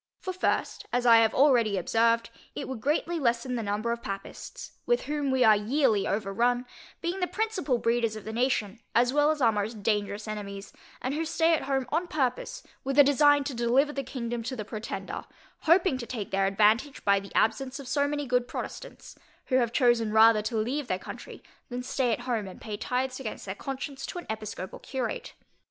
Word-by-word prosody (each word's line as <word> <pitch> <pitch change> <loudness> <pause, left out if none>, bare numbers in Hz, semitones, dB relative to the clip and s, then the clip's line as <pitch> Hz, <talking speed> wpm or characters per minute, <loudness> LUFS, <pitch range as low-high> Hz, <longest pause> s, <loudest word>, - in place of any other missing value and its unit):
For 375 - -4
first, 370 - -1
as 245 0 0
I 230 -1 +8
have 225 -1 +3
already 240 -7 +4
observed, 230 +4 +2 0.2
it - - -4
would 260 -4 -6
greatly 325 +5 0
lessen 240 -1 0
the 240 - -1
number 210 +2 -1
of 235 0 -3
Papists, 195 -2 -7 0.2
with 485 0 +2
whom 295 -1 -2
we 260 -1 +3
are 220 -2 +7
yearly 220 -1 +2
overrun, 230 +5 0 0.4
being 350 +3 -2
the 360 - 0
principal 400 - -1
breeders 230 -1 +1
of 215 - -8
the 220 - -6
nation, 230 -3 0 0.2
as 245 +2 +4
well 295 +1 +4
as 305 -3 0
our 230 - +6
most 210 0 -3
dangerous 210 0 -1
enemies, 200 -2 -6 0.3
and 255 - -1
who 315 +2 -1
stay 325 +1 +2
at 315 - 0
home 270 -1 0
on 335 +4 0
purpose 260 -7 -2 0.2
with 270 +1 -2
a 285 - +10
design 290 +1 +5
to 280 0 -4
deliver 250 +5 +2
the 275 - -2
kingdom 240 -3 -4
to 245 +3 -4
the 215 -4 -5
Pretender, 215 +1 -5 0.3
hoping 335 -4 +3
to 235 - -6
take 220 -6 -5
their 195 0 +2
advantage 215 +8 +2
by 200 0 +4
the 200 0 -11
absence 260 +4 +1
of 275 - -9
so 285 +2 +1
many 290 0 -2
good 250 -1 +1
Protestants, - - -7 0.4
who 260 - +4
have 240 -3 +2
chosen 240 -4 +3
rather 220 0 +6
to 220 +2 -2
leave 255 +6 -1
their 185 - 0
country, - - -9 0.3
than 250 0 -4
stay 250 -1 0
at 230 - -1
home 235 -5 -2
and 185 - -10
pay 215 -2 -5
tithes 255 +4 -2
against 235 -5 -6
their 190 - -4
conscience 270 +4 -6
to - - -6
an 350 - -6
episcopal 215 -4 -6
curate. 255 -4 -4
245 Hz, 205 wpm, -28 LUFS, 220-275 Hz, 0.4 s, a